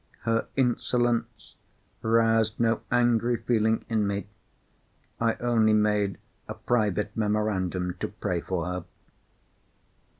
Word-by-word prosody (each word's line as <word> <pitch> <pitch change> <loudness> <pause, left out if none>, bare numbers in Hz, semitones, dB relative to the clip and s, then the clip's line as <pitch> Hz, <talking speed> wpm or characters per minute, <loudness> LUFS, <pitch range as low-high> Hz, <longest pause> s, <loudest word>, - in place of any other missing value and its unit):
Her 115 0 0
insolence 120 -2 0 0.5
roused 115 -1 +2
no 115 -1 +2
angry 120 0 +2
feeling 110 -2 +1
in 110 -3 +1
me; 100 -1 -2 0.9
I 115 -1 +1
only 115 -3 +2
made 105 -2 +2 0.3
a - - -6
private 105 -3 0
memorandum 100 -4 -1
to - - -2
pray 90 -2 -3
for 90 -1 -3
her. 90 -1 -4
110 Hz, 105 wpm, -27 LUFS, 100-115 Hz, 0.9 s, roused